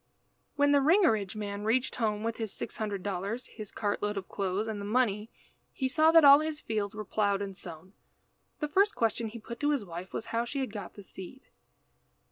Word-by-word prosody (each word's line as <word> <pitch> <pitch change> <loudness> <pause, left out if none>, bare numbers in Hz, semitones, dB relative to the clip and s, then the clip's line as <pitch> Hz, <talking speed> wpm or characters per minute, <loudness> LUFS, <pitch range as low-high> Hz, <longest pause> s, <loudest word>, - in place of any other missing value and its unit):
When 285 0 +4
the 285 - +6
Ringerige 270 - +3
man 205 -1 -4
reached 245 +4 +1
home 215 -3 0
with 230 0 -2
his 220 -3 -3
six - - -5
hundred 205 -4 -3
dollars, 200 +5 -3
his 215 -3 -9
cart 205 -1 -2
load 205 0 -1
of 190 - -4
clothes, 200 +2 -2
and 215 -2 -4
the - - -5
money, 210 -1 +1 0.4
he 265 - -1
saw 310 +4 +4
that 330 -2 +7
all 280 0 +10
his 310 -1 -3
fields 215 -4 -3
were 215 0 -5
ploughed 200 0 +1
and 195 -1 -6
sown. 180 +1 -9 0.7
The 300 - 0
first 395 +7 +3
question 230 0 0
he 225 +2 -8
put 235 +1 -8
to 290 - +1
his 280 -8 0
wife 175 +1 -7
was - - -4
how 230 +1 +2
she 275 +4 -4
had 260 -6 -3
got 205 -3 -7
the 205 - -10
seed. 190 +8 -10
215 Hz, 215 wpm, -30 LUFS, 200-260 Hz, 0.7 s, all